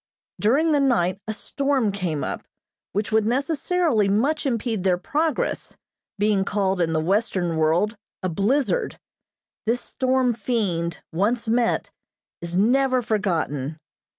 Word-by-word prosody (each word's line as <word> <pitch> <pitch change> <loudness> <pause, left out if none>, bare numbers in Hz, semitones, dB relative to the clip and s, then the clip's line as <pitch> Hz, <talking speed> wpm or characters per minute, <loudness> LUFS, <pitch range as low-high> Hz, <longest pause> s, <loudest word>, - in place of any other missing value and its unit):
During 285 +10 +3
the 295 - +3
night 205 -9 +1
a 220 - -1
storm 275 -3 0
came 180 -7 -2
up - - -4 0.5
which 205 +2 -2
would 220 -1 +3
necessarily 280 - +1
much 275 +10 +1
impede 230 -5 -1
their 185 -2 +3
progress, 300 - -2 0.4
being 205 -1 +2
called 195 -2 0
in 165 -1 +1
the 160 - +2
western 185 -1 0
world 165 +8 +2 0.3
a - - +1
"blizzard." 255 - 0 0.7
This 240 +2 +1
storm 255 -1 +1
fiend, 200 -7 -2
once 225 +7 0
met, 235 +1 +1 0.5
is 170 +1 -3
never 255 +4 +3
forgotten. 160 -9 -1
215 Hz, 125 wpm, -23 LUFS, 185-255 Hz, 0.7 s, During